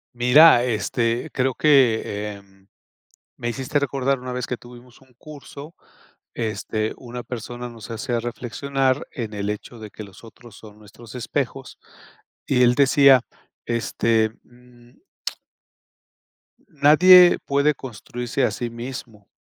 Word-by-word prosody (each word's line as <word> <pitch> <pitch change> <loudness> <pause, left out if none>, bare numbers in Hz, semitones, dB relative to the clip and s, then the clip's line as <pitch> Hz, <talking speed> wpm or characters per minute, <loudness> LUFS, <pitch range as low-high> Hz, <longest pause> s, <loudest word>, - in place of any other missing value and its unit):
Mira, 125 +2 +6
este, 115 +1 -1
creo 130 0 0
que, 130 -6 +4
eh, 105 0 -6 1.0
me 120 - -3
hiciste 135 +4 -2
recordar 135 -1 -1
una 125 0 -7
vez 125 -1 -3
que 125 - -4
tuvimos 120 0 -16
un 130 -1 -24
curso, 150 +1 -12 0.6
este, 110 -1 -3
una 125 -1 -8
persona 120 +1 -7
nos 115 -1 -12
hacía 115 +1 -3
reflexionar 130 +3 -2
en 115 -6 -6
el 100 0 -4
hecho 105 +3 -7
de 110 -1 -9
que 110 - -9
los 100 +2 -15
otros 115 -1 -15
son 105 -1 -15
nuestros 110 +3 -15
espejos 130 +2 -4 0.7
y 125 -2 +2
él 120 0 +4
decía 140 -2 +5 0.4
este, 115 -1 0
mm 120 - -22 1.7
nadie 175 +3 +6
puede 140 +2 +2
construirse 125 +1 -5
a - - +2
sí 120 - -4
mismo. 115 -3 -9
120 Hz, 125 wpm, -22 LUFS, 115-135 Hz, 1.7 s, Mira